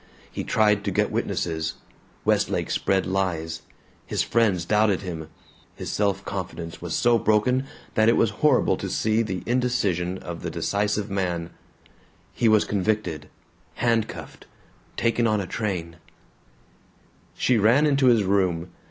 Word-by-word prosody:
He -, -, -4 dB
tried 105 Hz, -2 st, +2 dB
to -, -, +1 dB
get -, -, +1 dB
witnesses; 80 Hz, -1 st, -2 dB, 0.5 s
Westlake -, -, +1 dB
spread 95 Hz, -2 st, +1 dB
lies; 90 Hz, -4 st, -2 dB, 0.4 s
his -, -, -1 dB
friends 100 Hz, -7 st, +1 dB
doubted 105 Hz, -1 st, +2 dB
him; 80 Hz, -4 st, -5 dB, 0.5 s
his -, -, -5 dB
self 100 Hz, -1 st, 0 dB
confidence 85 Hz, -3 st, -6 dB
was 85 Hz, -2 st, -3 dB
so 120 Hz, -1 st, +3 dB
broken 125 Hz, +6 st, +2 dB, 0.3 s
that 110 Hz, +1 st, +4 dB
it 115 Hz, -, +3 dB
was -, -, +3 dB
horrible -, -, +3 dB
to -, -, -4 dB
see 110 Hz, +1 st, +1 dB
the 95 Hz, -5 st, -3 dB
indecision 105 Hz, -8 st, 0 dB
of 85 Hz, -2 st, -7 dB
the -, -, -3 dB
decisive 105 Hz, 0 st, -1 dB
man; 90 Hz, -3 st, -2 dB, 0.8 s
he 115 Hz, -, +2 dB
was 110 Hz, -1 st, +4 dB
convicted, 100 Hz, -7 st, -1 dB, 0.5 s
handcuffed, 115 Hz, -2 st, -2 dB, 0.5 s
taken 115 Hz, 0 st, +2 dB
on 105 Hz, -1 st, +2 dB
a 100 Hz, -, -3 dB
train 90 Hz, -5 st, -3 dB, 1.4 s
She 125 Hz, -3 st, +2 dB
ran 140 Hz, +8 st, +4 dB
to 135 Hz, -2 st, +3 dB
his 115 Hz, -4 st, +5 dB
room. 90 Hz, -3 st, +1 dB
100 Hz, 135 wpm, -24 LUFS, 90-110 Hz, 1.4 s, his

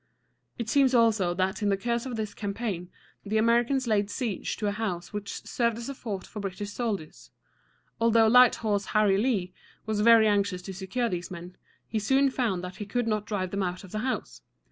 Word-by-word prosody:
It 235 Hz, -, -4 dB
seems 265 Hz, +1 st, +3 dB
also 215 Hz, -7 st, +3 dB
that 190 Hz, +3 st, -1 dB
in 205 Hz, -, +1 dB
the 195 Hz, -, +2 dB
course 235 Hz, +4 st, -2 dB
of 250 Hz, -, -4 dB
this 215 Hz, -2 st, -4 dB
campaign 200 Hz, -4 st, -4 dB, 0.3 s
the 215 Hz, +1 st, -1 dB
Americans 240 Hz, +4 st, +2 dB
laid 205 Hz, -3 st, +1 dB
siege 220 Hz, -2 st, -3 dB
to 215 Hz, -, -3 dB
a 205 Hz, -, +1 dB
house 195 Hz, -5 st, -4 dB
which 205 Hz, -1 st, -5 dB
served 235 Hz, -2 st, 0 dB
as 235 Hz, +3 st, -6 dB
a -, -, -3 dB
fort 205 Hz, -8 st, -5 dB
for 210 Hz, -, -8 dB
British 200 Hz, +1 st, -5 dB
soldiers. 200 Hz, -, -4 dB, 0.7 s
Although 230 Hz, 0 st, +5 dB
Light 250 Hz, +2 st, +7 dB
Horse 205 Hz, -3 st, -1 dB
Harry 200 Hz, -2 st, +4 dB
Lee 205 Hz, -6 st, 0 dB, 0.3 s
was 215 Hz, -1 st, -1 dB
very 225 Hz, 0 st, +7 dB
anxious 200 Hz, -3 st, +1 dB
to 195 Hz, -, -6 dB
secure 200 Hz, +6 st, -2 dB
these 180 Hz, -4 st, -4 dB
men, 180 Hz, 0 st, -9 dB, 0.3 s
he 220 Hz, -, -1 dB
soon 265 Hz, +6 st, +3 dB
found 220 Hz, -9 st, -1 dB
that 180 Hz, 0 st, -7 dB
he 210 Hz, -, -5 dB
could 240 Hz, +4 st, -1 dB
not 215 Hz, -2 st, -1 dB
drive 185 Hz, -4 st, -2 dB
them 200 Hz, -, -1 dB
out 180 Hz, 0 st, -3 dB
of 190 Hz, -, -12 dB
the 215 Hz, -, -3 dB
house. 255 Hz, +3 st, -3 dB
210 Hz, 205 wpm, -27 LUFS, 195-235 Hz, 0.7 s, Light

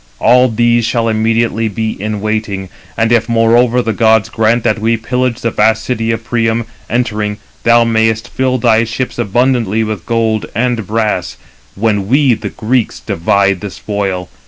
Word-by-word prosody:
All 125 Hz, -, +4 dB
these 120 Hz, +1 st, +2 dB
shall 115 Hz, 0 st, 0 dB
immediately 115 Hz, 0 st, 0 dB
be 110 Hz, +1 st, -2 dB
in 105 Hz, 0 st, -4 dB
waiting; 105 Hz, -3 st, -3 dB, 0.3 s
and 115 Hz, 0 st, +1 dB
if, 115 Hz, -1 st, +2 dB
moreover, 120 Hz, +2 st, +3 dB
the 115 Hz, -, -1 dB
gods 110 Hz, 0 st, +3 dB
grant 115 Hz, +1 st, +1 dB
that 110 Hz, -, +1 dB
we 115 Hz, +2 st, +1 dB
pillage 125 Hz, +1 st, -2 dB
the 115 Hz, -, -1 dB
vast 110 Hz, +1 st, +2 dB
city 115 Hz, -3 st, -2 dB
of 115 Hz, 0 st, -1 dB
Priam, 115 Hz, -1 st, 0 dB, 0.2 s
entering, 105 Hz, -4 st, -1 dB, 0.2 s
thou 115 Hz, 0 st, +4 dB
mayest 110 Hz, 0 st, +1 dB
fill 130 Hz, 0 st, -1 dB
thy 115 Hz, -2 st, +3 dB
ships 115 Hz, +2 st, -4 dB
abundantly 120 Hz, -1 st, +1 dB
with 110 Hz, -5 st, -5 dB
gold 110 Hz, -2 st, 0 dB
and 115 Hz, -3 st, -1 dB
brass, 105 Hz, -, -1 dB, 0.4 s
when 105 Hz, -2 st, 0 dB
we, 135 Hz, +2 st, +3 dB
the -, -, -4 dB
Greeks, 115 Hz, +1 st, -1 dB
divide 100 Hz, +2 st, 0 dB
the 105 Hz, -, -5 dB
spoil. 95 Hz, -3 st, -3 dB
115 Hz, 160 wpm, -14 LUFS, 110-120 Hz, 0.4 s, All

